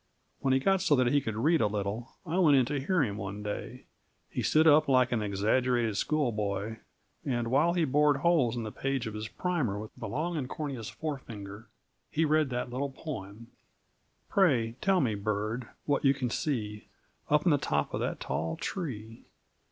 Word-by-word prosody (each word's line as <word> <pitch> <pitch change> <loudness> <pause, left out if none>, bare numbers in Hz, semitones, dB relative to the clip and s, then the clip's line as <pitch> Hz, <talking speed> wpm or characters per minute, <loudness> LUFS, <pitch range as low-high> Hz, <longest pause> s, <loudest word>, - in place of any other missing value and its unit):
When 135 - +1
he 130 - +5
got 195 +6 +2
so 150 - +4
that 125 -2 +2
he 145 - +4
could 110 -4 -4
read 155 +8 +3
a 105 - +4
little 105 +3 -4
I 175 +2 -1
went 150 -6 +6
in 130 - +4
to 145 +3 -2
hear 180 0 +2
him 105 -5 -2
one 100 +1 -5
day. 110 +4 -5 0.5
He - - -2
stood 155 +1 +3
up 155 0 +6
like 130 -2 +4
an 120 -3 +1
exaggerated 110 +3 +1
schoolboy, 110 -6 -1 0.5
and 120 -3 -1
while 155 +6 +4
he 175 -2 +2
bored 145 +1 +3
holes 145 -6 +2
in 115 - -2
the 110 - -5
page 135 0 -2
of 110 - -5
his 105 0 -4
primer 150 - -1
with 105 +1 -7
a 110 - -3
long 160 +10 -2
and 130 -3 -3
corneous 135 -8 -4
forefinger 115 -8 -6 0.4
he 160 +2 +1
read 155 -1 +2
that 125 0 -3
little 135 +3 -2
poem: 115 -6 -8 0.8
Pray 130 - +3
tell 195 -2 +3
me, 120 -6 +1
bird, 105 +3 -2 0.2
what 145 -1 +1
you 135 -1 +4
can 125 -3 -2
see 105 -9 -2 0.4
Up 150 0 +3
in 175 - +5
the 145 - +3
top - - -1
of - - -1
that - - -2
tall 80 +1 -2
tree? 115 - -5
125 Hz, 190 wpm, -30 LUFS, 110-150 Hz, 0.8 s, went